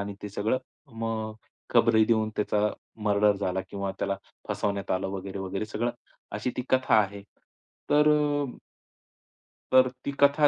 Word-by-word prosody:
आणि 100 0 -4
ते 105 - -4
सगळं 105 +5 0 0.4
मग 110 -1 -2 0.4
खबरी 110 -1 +5
देऊन 110 -2 +2
त्याचा 105 0 +1 0.4
मर्डर 105 0 +4
झाला 95 -1 -1
किंवा 100 -1 -2
त्याला 100 0 0 0.3
फसवण्यात 100 -1 -1
आलं 95 +1 0
वगैरे-वगैरे 95 +1 -4
सगळं 120 +3 -1 0.4
अशी 125 - -1
ती 125 - -1
कथा 130 -2 +3
आहे. 100 -1 -3 0.7
तर 150 +1 +5
अ 145 -1 +2 1.3
तर 130 0 +7 0.2
ती 140 - 0
कथा 145 +1 +6
105 Hz, 140 wpm, -28 LUFS, 100-130 Hz, 1.3 s, तर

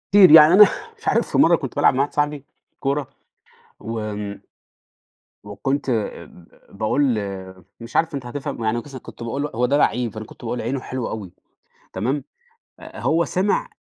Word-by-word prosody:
كتير 195 -5 +8
يعني 155 +1 +9
أنا 205 +3 +10 0.3
مش - - -13
عارف - - +1
في - - 0
مَرّة - - +6
كنت - - -6
بالعب - - +4
مع 130 - -2
واحد 145 - -2
صاحبي 150 -1 -1 0.3
كورة 140 0 -1 0.7
وآمم 105 -2 -5 1.0
وكُنت 135 +8 -3
آآ، 115 -5 -2
ب 85 - -18 0.3
باقول 125 +5 +1 0.7
مش 115 +1 -7
عارف 165 -1 +1
أنت 135 -3 -5
هتفهم 135 -1 -5
يعني 110 +2 0
قِصة 135 +2 -8
كنت 120 - -12
باقول 115 +5 -3
له 145 - -3
هو 125 +2 +1
ده 140 +3 +1
لعيب، 125 -5 +1
فأنا 110 0 -6
كنت - - -15
باقول: 120 +1 -3
"عينه 130 +4 -2
حلوة 130 -1 -5
أوي"، 100 -5 -7 0.6
تمام، 130 +8 -2 0.6
أ - - -11
هو 165 +2 +2
سمع 200 - 0
130 Hz, 175 wpm, -21 LUFS, 115-145 Hz, 1.0 s, أنا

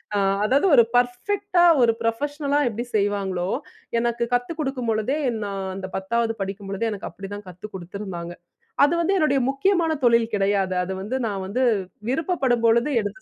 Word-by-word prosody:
ஆ - - +2 0.3
அதாவது 275 - +3
ஒரு 235 - +8
பர்ஃபெக்ட்டா 350 +10 +1 0.2
ஒரு 235 -1 +5
ப்ரொஃபஷ்னலா 285 +5 0
எப்பிடி 235 +2 -3
செய்வாங்களோ, 195 -3 0 0.5
எனக்கு 235 0 0
கத்துக் 245 +7 -1
கொடுக்கும்பொழுதே, 255 -3 -1 0.3
நான் 195 -1 -4
அந்த 190 -1 -5
10வது 225 +4 0
படிக்கும்பொழுதே 195 +2 -3
எனக்கு 200 - -5
அப்பிடிதான் 195 +3 -8
கத்து 180 +3 -10
கொடுத்துருந்தாங்க. 180 -1 -6 0.5
அது 290 +4 +4
வந்து 390 +4 +1
என்னுடைய 290 -5 +3
முக்கியமான 330 +4 +2
தொழில் 235 -1 +4
கிடையாது. 195 -2 +1
அது 190 +1 -4
வந்து 220 +7 -3
நான் 195 -2 -3
வந்து 250 +7 -1 0.5
விருப்பப்படும் 270 -6 0
பொழுது 235 +4 +4
எடுத்து 210 - -6
230 Hz, 145 wpm, -23 LUFS, 195-275 Hz, 0.5 s, ஒரு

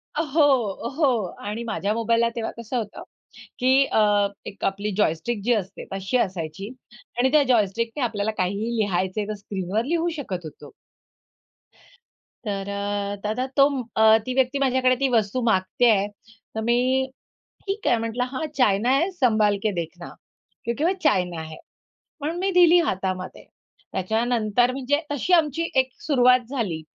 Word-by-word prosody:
अ, 315 - +1
हो, 275 -9 +1
हो. 255 - +2 0.2
आणि 215 +3 -4
माझ्या 215 -2 -2
मोबाईलला 230 +1 +2
तेव्हा 230 -1 -3
कसं 235 +2 -4
होतं 215 -3 -5 0.6
की 260 +2 +4
अ, 205 -2 +3 0.2
एक 200 - -9
आपली 200 +2 -1
जॉयस्टिक 205 +4 0
जी 240 +1 +3
असते 200 -2 -4
तशी 195 +6 -1
असायची 185 -1 -3 0.5
आणि 260 +2 +3
त्या 300 -2 +5
जॉयस्टिकने 230 +2 0
आपल्याला 220 -2 -1
काहीही 200 +6 -1
लिहायचं 190 -1 0
आहे 205 - -4
तर 215 - -3
स्क्रीनवर 200 +2 -3
लिहू 340 +3 0
शकत 185 - -5
होतो. 155 - -11 1.7
तर 200 -1 -3
अ, 200 0 -2
दादा 220 +5 -1
तोम 275 -1 +4 0.2
अ, 220 0 +7
ती 255 - -2
व्यक्ती 265 +1 +1
माझ्याकडे 255 -1 +3
ती 275 - +2
वस्तू 215 +4 -1
मागते 220 +3 +2
आहे. 205 -2 +3 0.5
तर 220 - -2
मी, 255 +3 +2 0.6
ठीक 400 +2 -3
आहे 240 - +4
म्हटलं, 230 +2 -2
"हां, 275 +4 -3
चायना 225 -1 +3
है 300 +8 +3
संभाल 215 - +2
के 215 - +2
देखना, 170 +1 -5 0.5
क्योंकि 235 +6 -2
वो 350 - +3
चायना 180 - +1
है." 160 0 -9 0.7
म्हणून 320 +4 -2
मी 390 - +1
दिली 350 -1 +6
हातामध्ये. 185 -1 -4 0.5
त्याच्या 220 +5 0
नंतर 240 0 +2
मी 270 - -5
जे 290 +1 +3
तशी 290 +6 -1
आमची 330 0 +2
एक 260 0 -2 0.2
सुरुवात 250 -3 +5
झाली 205 - -2
230 Hz, 155 wpm, -24 LUFS, 200-260 Hz, 1.7 s, अ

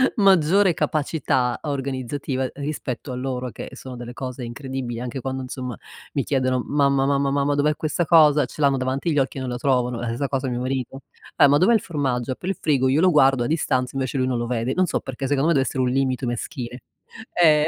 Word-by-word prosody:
maggiore 190 -2 +4
capacità 140 -6 0
organizzativa 135 -1 -3
rispetto 140 -3 -4
a - - -4
loro 125 -1 -3
che - - -8
sono 130 -1 -9
delle 120 0 -7
cose 125 0 -6
incredibili, 125 -1 -5
anche 125 +1 -5
quando, 130 +1 -3
insomma, 125 -2 -6 0.4
mi 140 - 0
chiedono: 130 -2 +1
"Mamma, 140 -2 +2
mamma, 140 0 +1
mamma 140 0 +1
dov'è 150 +1 +2
questa 160 +2 -1
cosa?". 150 -4 +6
Ce 150 - -13
l'hanno 140 -2 +3
davanti 130 +6 -1
gli - - -1
occhi 135 0 -1
e - - -3
non 130 - -3
la 120 - -3
trovano. 125 -2 0
Ehm, 120 - -3
stessa 125 +5 -2
cosa 135 -1 -2
mio 120 0 -2
marito: 130 +1 -3 0.4
"Eh, - - +7
ma 145 +1 +5
dov'è 190 +8 +4
il 220 - +4
formaggio?". 130 -6 -2
Apre 175 +8 -4
il 195 - 0
frigo, 135 -4 +2
io 140 +4 +3
lo 185 - +5
guardo, 135 -5 +4
a - - -1
distanza, 130 -5 0
invece 135 0 -2
lui 130 0 +1
non 125 -2 0
lo 120 - -2
vede. 120 +1 -1
Non 185 -1 +2
so - - -1
perché. 135 +1 -6
Secondo 145 +3 +2
me, - - +4
deve 135 -3 +2
essere 130 -1 -1
un 125 - +1
limite 130 0 0
maschile. 120 0 -5 0.5
Eh, 155 -3 +4
135 Hz, 220 wpm, -23 LUFS, 125-145 Hz, 0.5 s, Eh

